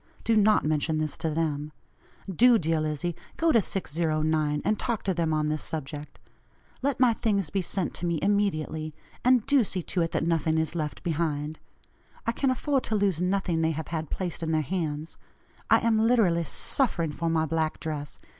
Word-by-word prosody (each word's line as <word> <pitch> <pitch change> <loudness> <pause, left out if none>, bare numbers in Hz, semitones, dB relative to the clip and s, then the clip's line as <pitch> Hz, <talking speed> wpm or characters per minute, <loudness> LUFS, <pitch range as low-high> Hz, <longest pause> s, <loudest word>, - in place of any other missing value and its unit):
(Do 230 - +2
not 215 -3 +4
mention 155 +1 +1
this 155 -1 -1
to 160 - -1
them.) 150 -1 -2 0.6
Do, 235 +6 +5
dear 165 -3 0
Lizzie, 155 +2 -2 0.2
go 330 0 +3
to 230 - +5
609, 155 -4 0
and 215 - +1
talk 235 -4 -2
to 190 - 0
them 165 -2 0
on 155 -1 +1
this 155 0 -1
subject. 150 -1 -5 0.6
Let 275 -2 0
my 250 -3 +5
things 200 -8 0
be 195 - 0
sent 185 0 -2
to 175 - -2
me 170 -1 0
immediately, 160 -6 0 0.3
and 250 -2 +4
do 280 -3 +4
see 185 -3 -3
to 180 - -1
it, 165 - +1
that 160 - -1
nothing 165 -1 +1
is 160 0 0
left 155 -3 -4
behind. 155 -2 -2 0.7
I 230 - +2
can 270 +3 0
afford 270 +1 0
to 220 - -1
lose 195 -5 +1
nothing 180 -3 0
they 160 0 +2
have 160 0 -5
had 160 -2 -3
placed 180 -3 -3
in 160 -1 -1
their 155 -1 +2
hands. 155 -2 -3 0.5
I - - +5
am 225 -1 +2
literally 220 -8 +3
suffering 170 - 0
for 165 +3 -2
my 160 -1 +2
black 160 0 -1
dress. 150 -3 -5
165 Hz, 190 wpm, -27 LUFS, 155-200 Hz, 0.7 s, Do